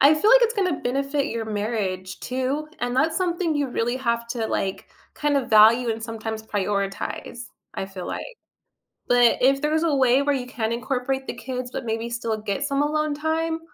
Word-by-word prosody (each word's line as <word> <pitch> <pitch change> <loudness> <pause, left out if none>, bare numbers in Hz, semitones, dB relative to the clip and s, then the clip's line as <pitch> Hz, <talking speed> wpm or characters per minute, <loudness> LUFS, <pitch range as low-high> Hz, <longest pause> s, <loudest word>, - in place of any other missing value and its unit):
I 285 +3 +7
feel 340 +8 +3
like - - +8
it's 470 0 +3
gonna 365 - 0
benefit 275 +3 0
your 230 -5 -3
marriage 205 -4 -3
too, 260 +4 -2
and 245 0 -1
that's 315 +5 +2
something 345 -2 0
you 290 -2 0
really 240 0 -1
have 235 -2 -1
to, 235 -2 -2
like, 190 -1 -2 0.3
kinda 285 -3 0
value 225 +3 +6
and 225 0 -3
sometimes 220 -1 -5
prioritize, 205 +3 -3 0.3
I 190 - -3
feel 190 -2 -7
like, - - -4 0.8
but 245 -1 +5
if 275 +2 +4
there's 310 +2 +1
a 330 -3 +2
way 260 0 +4
where 290 0 +2
you 250 -2 -4
can 225 -3 -2
incorporate 265 +2 -2
the - - -3
kids, 250 +1 -5
but 260 - -5
maybe 225 +1 -2
still 230 -2 -2
get 215 +5 -3
some 280 -1 0
alone 305 0 0
time, 320 +2 -1
250 Hz, 190 wpm, -24 LUFS, 225-290 Hz, 0.8 s, like